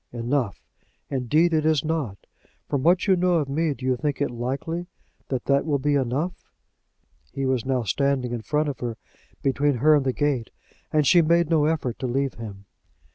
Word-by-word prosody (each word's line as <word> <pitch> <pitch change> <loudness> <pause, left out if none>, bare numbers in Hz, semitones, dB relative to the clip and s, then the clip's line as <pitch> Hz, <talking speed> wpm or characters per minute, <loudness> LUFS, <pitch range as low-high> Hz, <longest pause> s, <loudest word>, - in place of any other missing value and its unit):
"Enough! 120 -1 -2 0.5
Indeed 150 +6 +2
it 155 -1 +2
is 155 -1 +2
not. 150 -11 -2 0.5
From 140 -3 -1
what 175 +6 +3
you 195 -2 +4
know 180 0 +2
of 155 -4 +1
me 150 +1 0
do 130 - -8
you 130 -1 +2
think 145 +3 -2
it 145 -4 0
likely 140 +8 -3 0.4
that 130 -3 -3
that 140 0 +3
will 150 -3 +1
be 145 +2 0
enough?" 140 +6 0 1.0
He 135 - -3
was 130 -3 0
now 130 -2 +1
standing 130 +3 0
in 120 -2 -3
front 150 +6 0
of 140 - -4
her, 120 -2 -4 0.5
between 140 +1 +2
her 150 +6 +4
and 145 -2 +3
the 130 - +1
gate, 135 -4 -1 0.4
and 150 -1 +2
she 175 +5 +6
made 170 0 +2
no 155 -2 +4
effort 150 -7 -1
to 130 - -2
leave 135 +1 0
him. 100 -4 -9
140 Hz, 190 wpm, -24 LUFS, 125-155 Hz, 1.0 s, she